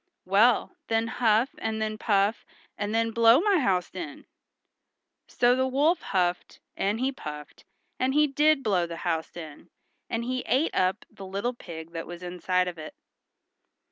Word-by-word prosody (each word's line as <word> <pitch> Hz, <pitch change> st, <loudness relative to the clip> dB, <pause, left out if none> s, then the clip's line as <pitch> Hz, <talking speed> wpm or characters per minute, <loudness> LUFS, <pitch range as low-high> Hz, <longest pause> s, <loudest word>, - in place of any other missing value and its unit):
"Well, 225 Hz, -, +3 dB
then 225 Hz, 0 st, +1 dB
huff, 230 Hz, +1 st, +2 dB
and 220 Hz, 0 st, -2 dB
then 215 Hz, 0 st, -3 dB
puff, 205 Hz, 0 st, +1 dB, 0.3 s
and 205 Hz, 0 st, -3 dB
then 225 Hz, 0 st, +1 dB
blow 230 Hz, +2 st, +6 dB
my 395 Hz, 0 st, +3 dB
house 185 Hz, -9 st, 0 dB
in." 170 Hz, -6 st, -7 dB, 1.0 s
So 245 Hz, 0 st, +3 dB
the 260 Hz, 0 st, +1 dB
wolf 290 Hz, +7 st, +2 dB
huffed, 180 Hz, -2 st, -1 dB, 0.2 s
and 205 Hz, +3 st, -1 dB
he 260 Hz, +2 st, 0 dB
puffed, 150 Hz, -, -9 dB, 0.3 s
and 260 Hz, +2 st, +1 dB
he 300 Hz, 0 st, +5 dB
did 295 Hz, 0 st, +2 dB
blow 185 Hz, -6 st, +1 dB
the 170 Hz, 0 st, -7 dB
house 165 Hz, 0 st, -2 dB
in, 155 Hz, -4 st, -10 dB, 0.4 s
and 230 Hz, +1 st, -2 dB
he 255 Hz, +1 st, -2 dB
ate 265 Hz, +8 st, +1 dB
up 185 Hz, +2 st, 0 dB
the 195 Hz, -, -10 dB
little 200 Hz, +6 st, -2 dB
pig 165 Hz, -7 st, -9 dB
that 165 Hz, -1 st, -6 dB
was 175 Hz, 0 st, -9 dB
inside 180 Hz, +1 st, 0 dB
of 175 Hz, -2 st, -6 dB
it. 155 Hz, -, -9 dB
215 Hz, 165 wpm, -27 LUFS, 180-250 Hz, 1.0 s, blow